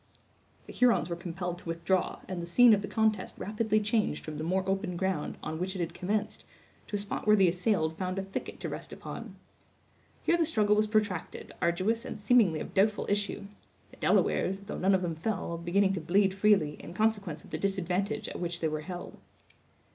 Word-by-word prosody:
The - - -10
Hurons 240 -8 +3
were 170 - -2
compelled 175 0 -5
to 170 - -9
withdraw, 170 +3 0
and 185 -2 -4
the 170 - -6
scene 240 +6 +7
of 205 - +3
the 205 - -4
contest 220 -3 0
rapidly 215 +1 0
changed 215 +1 0
from 150 -1 -6
the - - -3
more 185 +3 0
open 190 -2 -1
ground, 190 -4 -1
on 160 +1 -4
which 185 +2 -2
it - - -4
had 170 -1 -2
commenced, 205 +4 -2 0.4
to - - -4
a - - +2
spot 205 +1 -4
where 210 - +7
the 195 -3 +5
assailed 175 -3 0
found 185 0 -2
a 195 - -1
thicket 195 0 -6
to - - -3
rest - - -7
upon. - - -8 0.9
Here 340 - +3
the 335 - +3
struggle 210 -9 +3
was 215 0 +2
protracted, 210 -5 -1
arduous 185 +7 +1
and 260 - -6
seemingly 205 -7 +4
of - - -7
doubtful 205 +2 +2
issue; 205 0 -1 0.5
the - - -16
Delawares, 195 +1 +2
though 200 - -6
none 190 +1 +4
of 185 - 0
them 170 -2 -1
fell, 170 0 -3
beginning 190 +3 +2
to 185 - -3
bleed 190 +4 +3
freely, 195 -7 +3
in 170 - -10
consequence 200 -7 0
of - - -16
the 155 - -3
disadvantage 195 +1 -1
at - - -6
which 175 0 -2
they 160 - +1
were 155 0 -3
held. 175 +3 -7
190 Hz, 205 wpm, -30 LUFS, 175-210 Hz, 0.9 s, scene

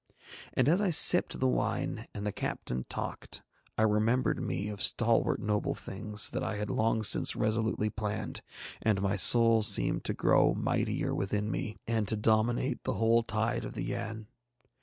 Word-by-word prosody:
And 130 - +2
as 175 +6 +3
I 205 - +1
sipped 165 - +6
the - - +2
wine 60 -1 -2
and 105 - -6
the 105 - -1
captain 65 -8 -4
talked, - - -6 0.3
I 110 - +2
remembered 110 +4 +1
me 100 +3 -3
of 105 -2 -6
stalwart - - +1
noble 105 0 -1
things 105 +1 -1
that - - -3
I 110 - -3
had 105 0 -4
long 110 0 0
since - - +3
resolutely 110 0 -1
planned, 105 -1 -4 0.4
and 105 -3 +1
my 100 +1 0
soul 115 +3 +5
seemed 105 -2 +1
to - - -2
grow - - +3
mightier - - -1
within 105 +2 -2
me 110 - -4
and 110 -2 -1
to 110 - +1
dominate 110 +4 0
the 130 - -2
whole 115 +1 +3
tide 110 0 -2
of - - -7
the - - -5
Yann. 110 +1 -5
110 Hz, 170 wpm, -30 LUFS, 105-115 Hz, 0.4 s, sipped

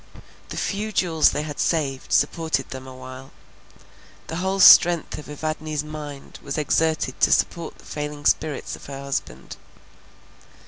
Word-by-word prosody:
The - - -6
few 215 +1 -2
jewels 165 -6 +3
they 150 - -2
had 150 -2 -7
saved, 140 -5 -1
supported 160 -5 +1
them 130 0 -7
awhile. 130 +1 -10 1.0
The 165 - -4
whole 190 +2 -1
strength 175 -4 +7
of 150 - -11
Evadne's 155 0 -3
mind 150 -2 -9
was 140 +1 -5
exerted 155 -2 0
to - - +4
support 170 -2 0
the - - -19
failing 150 -1 -6
spirits 155 0 0
of - - -13
her 135 -1 -7
husband. 135 - -5
150 Hz, 140 wpm, -23 LUFS, 140-160 Hz, 1.0 s, strength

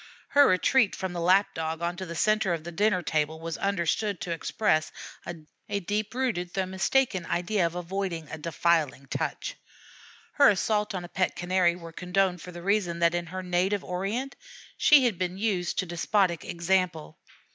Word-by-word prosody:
Her 285 0 +6
retreat 205 +4 +3
from 190 -1 -4
the 175 - -3
Lap 185 +4 +3
dog 160 +1 -3
onto 175 +2 -3
the 170 - -6
centre 215 0 +2
of 160 - -8
the 175 - -7
dinner 195 0 +1
table 155 0 -1
was 165 0 -5
understood 200 +1 0
to 175 - -4
express 160 -1 0 0.4
a 175 +5 -6
deep 210 +4 -3
rooted 195 -10 -2
though 190 -1 0
mistaken 190 +2 +1
idea 180 +1 +1
of 165 - -8
avoiding 180 -2 -3
a 160 - -6
defiling 160 -3 0
touch. - - -3 0.8
Her 285 -4 +8
assaults 210 +1 0
on 180 -1 -4
a - - -8
pet 185 +1 -1
Canary 175 -1 +2
were 165 -2 -10
condoned 180 0 0
for 180 - -9
the 175 -1 -9
reason 195 -3 +1
that 170 0 +3
in 175 -1 -2
her 185 +2 -6
native 180 +3 0
Orient 200 +9 -3 0.4
she 290 -4 +6
had 220 -7 0
been 185 0 -2
used 195 -4 -1
to 185 - +1
despotic 175 0 0
example. 170 - -1
180 Hz, 175 wpm, -27 LUFS, 170-200 Hz, 0.8 s, Her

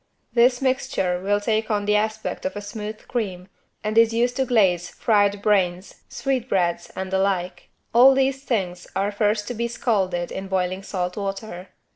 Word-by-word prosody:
This 245 +2 +4
mixture 255 -9 0
will 205 +2 +1
take 215 +1 0
on 205 -2 0
the 210 0 +2
aspect 215 +1 -1
of 280 - -3
a - - -3
smooth 210 +1 -7
cream 190 -7 -3 0.4
and 215 +1 +2
is 230 0 +4
used 245 +1 +1
to 265 - +2
glaze 190 -8 +2
fried 205 -2 +1
brains, 185 -3 0
sweetbreads 195 -11 -1
and 190 0 -4
the 190 - +1
like. 180 -2 -1 0.2
All 260 +3 +7
these 270 0 +1
things 180 -9 -2
are 195 +2 0
first 210 0 0
to - - -2
be 235 +1 -2
scalded 190 -7 -1
in 190 0 -5
boiling 185 0 -1
salt 180 -2 -3
water. 195 -2 -5
205 Hz, 170 wpm, -23 LUFS, 185-230 Hz, 0.4 s, All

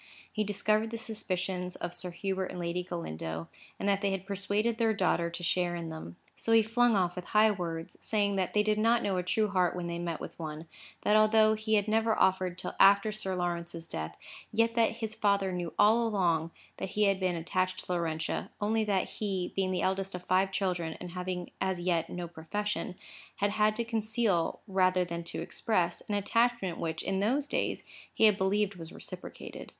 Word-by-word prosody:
He 215 - 0
discovered 215 +2 +1
the 230 - -4
suspicions 185 -5 -2
of 175 - -5
Sir 180 - -3
Hubert 190 +2 -2
and 180 - -7
Lady 175 +1 -1
Galindo, 80 - -5 0.3
and - - -2
that 200 -1 +2
they 200 - +1
had 195 -1 -3
persuaded 205 +4 0
their 225 -2 +3
daughter 175 -3 +1
to 170 +1 -6
share 175 0 +1
in 170 -1 -5
them. 160 - -8 0.2
So 225 - 0
he 225 -1 +7
flung 235 +1 +3
off 180 -2 +1
with 180 - -6
high 215 +1 +5
words, 170 -4 -5
saying 205 -2 +1
that 190 0 -1
they 210 - +5
did 215 0 +1
not 230 +2 +3
know 195 -2 0
a - - +1
true 210 +4 +1
heart 185 -3 +2
when 180 -1 -3
they 170 0 -3
met 170 -2 -3
with - - -8
one; 155 -1 -5
and - - -12 0.4
that 210 - +4
although 215 0 +5
he 220 0 0
had 205 0 +2
never 220 0 +2
offered 185 -1 +2
till - - -1
after 200 +2 +6
Sir 195 -3 -3
Lawrence's 170 -2 -3
death, 80 - -5 0.3
yet 230 +1 +2
that 230 -1 +3
his 220 -2 -3
father 200 -3 +2
knew 175 -2 -3
all 230 +3 +5
along 170 -6 +1 0.3
that 190 - -4
he 210 - +4
had 195 -2 +3
been 185 -2 0
attached 185 +2 -1
to - - -5
Laurentia, 160 -2 -2
only 220 +1 +1
that 200 -3 +1
he, 190 -4 -3
being 190 -1 +1
the 185 - -1
eldest 190 0 -1
of 180 - -7
five 190 +2 +2
children, 180 -4 -1
and 180 - -7
having 180 0 -4
as 190 -2 0
yet 175 -2 0
no 175 -1 -4
profession, 185 +4 -3 0.4
had 205 0 +1
had 215 0 +2
to 235 +1 -2
conceal, 220 -5 0
rather 185 -2 +3
than 170 0 -5
to 170 - -4
express, 175 -6 0
an 205 - +1
attachment, 230 -2 +1
which, 160 -1 -2
in 195 0 -1
those 265 +8 +1
days, - - -1 0.3
he - - 0
had 215 -2 +7
believed 200 +1 +1
was 165 -4 -9
reciprocated. - - -8
190 Hz, 205 wpm, -30 LUFS, 175-215 Hz, 0.4 s, he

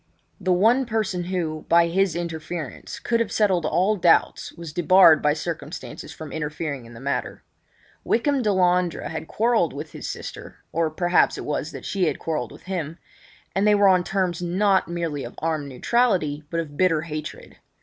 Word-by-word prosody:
The 185 -1 0
one 230 +8 +3
person 210 -6 -1
who, 165 -4 -3
by 170 0 +6
his 185 0 +1
interference, 165 -3 -5
could 230 -1 0
have 230 -3 -1
settled 190 -6 +2
all 195 +4 +2
doubts 170 -2 +2
was 165 -3 -9
debarred 175 -2 +6
by 150 0 +3
circumstances 155 -1 -6
from 155 -2 -9
interfering 150 -4 -4
in 120 - -13
the - - -10
matter. 140 +2 -3 0.6
Wykham 275 +3 +1
Delandre 180 -5 +1
had 160 0 -5
quarrelled 225 -6 +1
with 150 +2 -7
his - - -6
sister—or 165 0 -4
perhaps 175 +3 +2
it - - -6
was 150 0 -2
that - - -9
she 195 -2 0
had - - 0
quarrelled 160 -2 -3
with - - -14
him—and 185 +3 -5
they 210 - +6
were 205 -1 +5
on 185 -2 +5
terms 180 -2 -1
not 190 +3 +2
merely 165 -5 -3
of 120 - -8
armed 155 -3 -2
neutrality 155 - +1
but 165 - -2
of 150 -3 -5
bitter 165 -4 +3
hatred. 155 -1 -7
170 Hz, 170 wpm, -24 LUFS, 155-190 Hz, 0.6 s, by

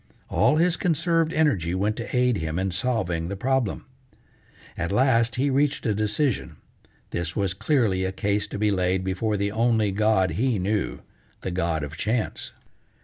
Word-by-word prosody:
All - - +3
his 170 +2 +2
conserved 165 -1 +1
energy 105 - +1
went 105 +3 0
to 115 - -5
aid 125 -2 +3
him 80 -1 -3
in 95 +1 -1
solving 90 -6 -1
the 100 - -4
problem. 130 +1 -1 0.9
At 85 +1 -3
last 115 0 +3
he 140 +2 +1
reached 145 +2 +1
a 110 - +2
decision: 110 +5 -1 0.6
this 85 -1 -3
was 100 -3 0
clearly 110 -3 +1
a 95 - -1
case 100 +1 -1
to - - -6
be 105 0 +2
laid 95 -1 +1
before 100 +3 -1
the 100 +1 -1
only 110 -2 +2
god 105 -2 +2
be 125 0 +1
knew, 100 +3 -1 0.4
the 95 - -3
god 85 -4 -1
of 75 +2 -7
Chance. 110 +1 -2
105 Hz, 165 wpm, -25 LUFS, 95-125 Hz, 0.9 s, All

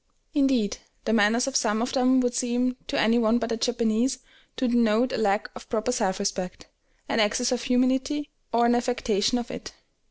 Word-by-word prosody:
Indeed, 270 -8 +1 0.3
the 220 - +1
manners 225 +3 +3
of 270 0 -4
some 215 -4 +2
of 245 +3 -2
them 260 -1 +3
would 245 -1 0
seem, 250 +1 0
to 285 - -1
any 230 +2 +3
one 225 0 +3
but 225 0 -3
a 230 - -1
Japanese, 240 +1 0 0.4
to 260 - 0
denote 235 0 +2
a - - -1
lack 205 -1 0
of - - -11
proper 225 +1 -1
self 200 -7 0
respect, 200 -2 -4 0.4
an - - 0
excess 235 +4 +2
of 245 -1 0
humility, 265 +4 0 0.2
or 235 +1 +3
an 235 - +4
affectation 240 -2 0
of 240 +1 -5
it. - - -8
240 Hz, 190 wpm, -25 LUFS, 220-255 Hz, 0.4 s, an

